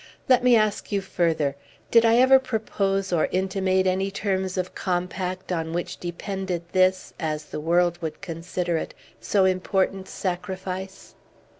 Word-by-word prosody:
Let 255 -2 +5
me 250 -1 +6
ask 215 -1 +1
you, 200 - +2
further, 165 -7 0 0.4
did 230 0 +6
I 225 0 +5
ever 260 +2 +7
propose 195 -6 -1
or 160 - +3
intimate 190 0 +1
any 190 +1 +1
terms 190 -1 -2
of 185 0 -2
compact, 185 0 -3
on 165 -2 -2
which 175 +1 -3
depended 180 0 -4
this 185 0 +2
as 155 -2 -2
the - - -6
world 175 +2 +2
would 160 -2 -4
consider 170 -1 -3
it - - -5 0.2
so 195 -2 +2
important 190 +1 0
sacrifice?" 190 0 -5
185 Hz, 145 wpm, -25 LUFS, 175-195 Hz, 0.4 s, ever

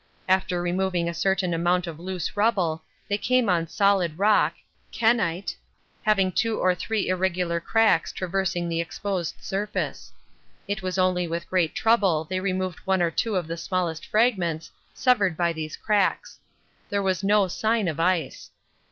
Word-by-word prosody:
After 185 -1 +1
removing 180 -1 0
a 170 - -2
certain 185 +1 0
amount 175 +2 +1
of 165 -2 -7
loose 180 0 -4
rubble 195 -7 +1 0.2
they 205 0 -1
came 255 0 +2
on 170 -2 +1
solid 190 -3 +1
rock, 210 +2 +3 0.4
kenyte, 210 -6 +1 0.5
having 195 -4 +2
two 225 +4 0
or 185 - +3
three 215 +4 -2
irregular 180 -2 0
cracks 220 -1 +2
traversing 185 -1 -2
the 165 0 -1
exposed 180 0 -3
surface. 205 +3 -3 0.6
It 205 0 -2
was 185 0 -3
only 185 -1 +2
with 170 +1 -4
great 180 -4 0
trouble 200 -9 +3
they 185 +4 -3
removed 185 -1 -2
one 190 -2 +1
or 170 - +1
two 220 +4 -1
of 180 -3 0
the 165 +1 -5
smallest 170 -2 -2
fragments 185 -8 +1 0.2
severed 205 -10 +2
by 170 -1 +1
these 155 -1 -6
cracks. 205 -2 0 0.5
There 200 0 0
was 190 0 0
no 205 0 +3
sign 220 +2 0
of 160 -1 -3
ice. 165 -4 0
185 Hz, 155 wpm, -25 LUFS, 170-200 Hz, 0.6 s, rock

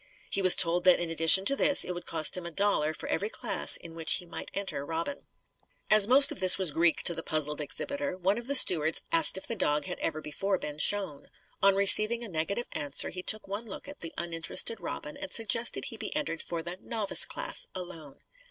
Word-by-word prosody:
He 195 - -2
was 185 -1 +7
told 175 0 +4
that 180 - +3
in 170 -1 -6
addition 165 +4 +5
to 275 - 0
this 280 0 +5
it - - -7
would 175 - -11
cost 160 -2 +4
him 180 -2 -4
a - - -10
dollar 170 -4 -1
for - - -9
every 205 - -4
class - - +2
in 165 - -14
which 165 -1 +3
he 180 - -1
might 170 - -10
enter 200 -7 -6
Robin. 165 - -7 0.6
As 215 -1 +5
most 275 +3 +5
of - - -6
this 185 -1 +6
was 185 -5 +2
Greek 165 +2 -1
to 170 - +1
the 165 - -8
puzzled 150 -1 -4
exhibitor, 280 - -6
one 195 +4 -2
of 240 - -7
the 280 - -1
stewards 160 - +4
asked 165 +2 +2
if 190 - -5
the 230 - -5
dog 150 -7 -3
had - - -9
ever 155 -1 -5
before 190 +6 -5
been 150 -3 -9
shown. 190 -6 -3 0.3
On 195 0 +2
receiving 215 +4 +4
a 230 - -8
negative 185 +8 -5
answer 145 -1 -2
he 180 - -9
took 215 +3 -2
one 205 +4 -8
look 205 - -11
at 290 0 -13
the 165 - -9
uninterested 170 +6 -1
Robin 295 - -9
and 290 0 -10
suggested 230 +1 -1
he 225 - -7
be - - -7
entered 285 - -4
for 170 -1 -7
the 175 +2 -9
"novice 220 -4 +2
class," - - -3
alone. 170 -6 -12
180 Hz, 225 wpm, -26 LUFS, 165-215 Hz, 0.6 s, was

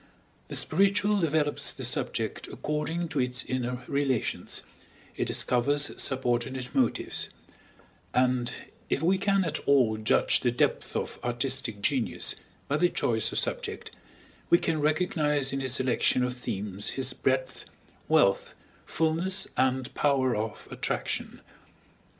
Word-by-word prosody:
The - - -3
spiritual 200 +4 +3
develops 155 -3 +1
the - - -5
subject - - -1
according 160 +3 -3
to 150 - -2
its 125 0 0
inner 125 0 -3
relations, 140 -4 -1 0.5
it - - -1
discovers 145 +4 +1
subordinate 125 0 -1
motives; 130 -3 0 0.8
and, 125 -1 +2 0.4
if 140 - 0
we 185 +3 +3
can 195 -1 +2
at - - -2
all 125 -6 +4
judge 110 -1 +3
the - - +1
depth - - 0
of - - -3
ar 120 - -1
artistic 120 -3 -2
genius 130 -5 +1 0.3
by 145 - +1
the 175 +2 +3
choice 110 -8 0
of - - -3
subject, - - -2 0.6
we 170 - +7
can 160 -3 -1
recognize 150 -3 +1
in 135 - -1
his 130 -1 0
selection 130 -1 +2
of 125 0 -1
themes 100 -4 -4
his 130 -1 +1
breadth, 130 0 -1 0.4
wealth, - - +3 0.3
fullness, 165 +4 0
and 130 0 +1
power 135 -4 +2
of 110 0 -4
attraction. - - -3
135 Hz, 130 wpm, -28 LUFS, 125-150 Hz, 0.8 s, we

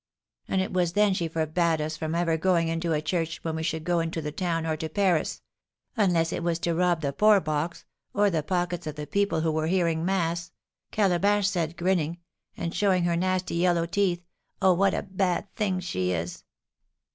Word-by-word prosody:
"And 190 - +1
it 190 - -3
was 175 -2 +1
then 205 0 +4
she 170 -3 -1
forbade 160 +1 0
us 155 +1 -2
from 160 0 -3
ever 170 -1 +1
going 170 0 +2
into 165 +1 -1
a 155 -1 0
church 165 0 -1
when 160 -1 -2
we 160 - -3
should 160 -1 -2
go 175 0 +1
into 165 0 -2
the 150 -1 -4
town, 165 0 -1
or 160 -1 0
to 160 0 -4
Paris; 180 -2 0 0.5
'Unless 175 -6 +2
it - - -2
was 170 -1 0
to 170 0 -1
rob 175 -1 +2
the 140 -2 -1
poor 210 +4 +5
box, 155 +1 -3 0.3
or 205 0 +2
the 160 -3 +1
pockets 175 +1 -2
of 150 - -4
the 150 -1 -5
people 200 +1 0
who 160 0 +1
were 155 0 0
hearing 170 -2 +1
mass,' 170 -2 -1 0.4
Calabash 200 0 +2
said, 170 -4 -1
grinning, 170 -2 0 0.4
and 170 0 -3
showing 190 -3 +2
her 170 0 +1
nasty 185 +1 0
yellow 170 -1 +2
teeth. 175 -1 0 0.3
Oh, 190 -1 +5
what 195 +2 +2
a - - -2
bad 190 0 -1
thing 195 -4 0
she 95 - -2
is!" 85 0 -4
170 Hz, 200 wpm, -27 LUFS, 160-185 Hz, 0.5 s, poor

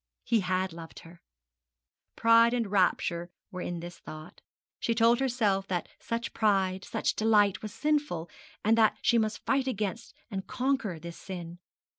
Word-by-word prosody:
He 230 - +2
had 185 -1 -1
loved 165 -1 -10
her! 170 +1 -15 0.9
Pride 230 +1 +5
and 230 -5 -1
rapture 175 -3 +1 0.2
were 185 - -5
in 175 -1 -4
the 175 +1 -6
thought. 155 -2 -11 0.4
She 230 - 0
told 230 +1 +4
herself 220 -7 +1
that 180 -2 -2
such 230 +2 -3
pride, 195 -3 +1
such - - -1
delight 210 -3 +3
was 215 - -6
sinful, 295 - 0 0.4
and 220 +1 +5
that 220 -1 +4
she 235 - +4
must 215 -1 -2
fight 270 -1 +1
against 215 -2 -3 0.2
and 190 -1 -4
conquer 255 -8 -1
this 170 +1 -9
sin. 175 -2 -7
205 Hz, 155 wpm, -29 LUFS, 180-230 Hz, 0.9 s, Pride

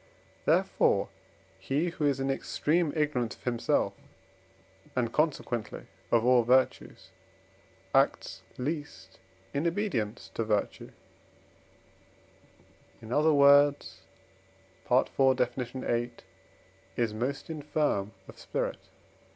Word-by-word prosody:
Therefore - - +2 0.5
he 150 +6 -1
who 155 -3 -1
is 140 -2 0
in 135 0 0
extreme 155 +4 0
ignorance 145 -7 0
of - - -25
himself, 120 -2 0 1.0
and 120 -2 -1
consequently 135 -7 -1 0.2
of 115 0 +3
all 125 -1 +5
virtues, 130 +3 +1 0.8
acts - - +1 0.2
least 125 - -5 0.3
in 145 +4 0
obedience 165 - -2
to 115 - -1
virtue; 105 -2 -2 2.1
in 115 +2 -7
other 155 +3 +4
words 145 0 +4 0.9
(IV. 130 +1 +3
Def. - - 0
viii.), 120 -1 -2 0.9
is 115 -3 0
most 135 +8 -3
infirm 150 -9 -1
of - - -13
spirit. - - -3
130 Hz, 95 wpm, -29 LUFS, 120-150 Hz, 2.1 s, all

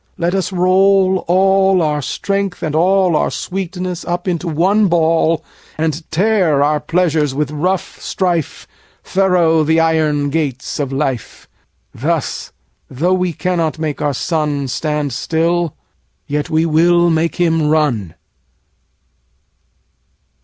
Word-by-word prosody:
40 - - -12
Let 175 - 0
us 195 0 -1
roll 190 +1 +3
all 190 0 +3
our 150 -1 0
strength 195 +6 -3
and 155 -2 -2
all 180 +1 +3
Our - - +1
sweetness 180 -1 -4
up 175 +1 -3
into 175 -1 -2
one 190 +7 +2
ball, 165 -1 +2 0.3
And 155 0 -2
tear 175 -5 +2
our 150 +1 +1
pleasures 155 -3 0
with 150 0 -1
rough 180 +5 -2
strife 175 -5 -2 0.4
Thorough 180 -4 +2
the 160 +2 +2
iron 155 -3 +1
gates 140 -5 -3
of 140 -2 -2
life: 135 -5 -3 0.5
Thus, - - -2 0.4
though 165 +8 0
we 185 -1 0
cannot 170 -2 -1
make 155 -2 -3
our 145 -2 0
sun 150 -2 -1
45 135 -2 -4
Stand 150 -2 -2
still, 165 +4 -1 0.5
yet 145 0 -3
we 160 +1 +1
will 170 +2 +3
make 160 +1 0
him 165 -3 +1
run. 130 - 0
165 Hz, 130 wpm, -16 LUFS, 150-180 Hz, 0.5 s, roll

